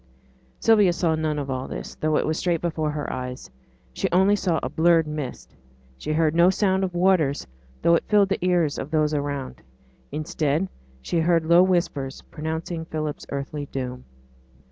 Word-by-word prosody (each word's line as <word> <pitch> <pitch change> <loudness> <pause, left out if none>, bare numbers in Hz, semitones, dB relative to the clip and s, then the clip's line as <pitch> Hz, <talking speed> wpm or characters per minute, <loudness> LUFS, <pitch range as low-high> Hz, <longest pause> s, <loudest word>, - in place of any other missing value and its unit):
Sylvia 210 -5 +5
saw 170 -2 +1
nothing 155 -1 -1
of 140 -2 -3
all 130 0 -3
this, - - -6
though 155 0 0
it - - +1
was 155 - 0
straight 175 -2 +1
before 160 -2 -1
her 150 -1 -3
eyes. 125 - -6 0.4
She - - -1
only 190 +3 +4
saw 175 -5 0
a - - 0
blurred 165 0 +3
mist; 150 -4 -6 0.4
she 150 - -5
heard 155 -1 +2
no 170 +2 +5
sound 190 0 +1
of 180 -2 -2
waters, 175 -6 +2 0.4
though 170 - +5
it 170 - +2
filled 205 -2 +4
the 195 - -1
ears 175 -5 +1
of - - -5
those 155 -1 +1
around. 140 -3 -3 0.5
Instead 155 +3 -1 0.3
she 170 - 0
heard 165 0 +2
low 170 +2 +6
whispers 170 -7 0
pronouncing 160 +1 -4
Philip's 155 -2 -4
earthly 140 +1 -4
doom. 125 -2 -5
160 Hz, 170 wpm, -24 LUFS, 145-175 Hz, 0.5 s, low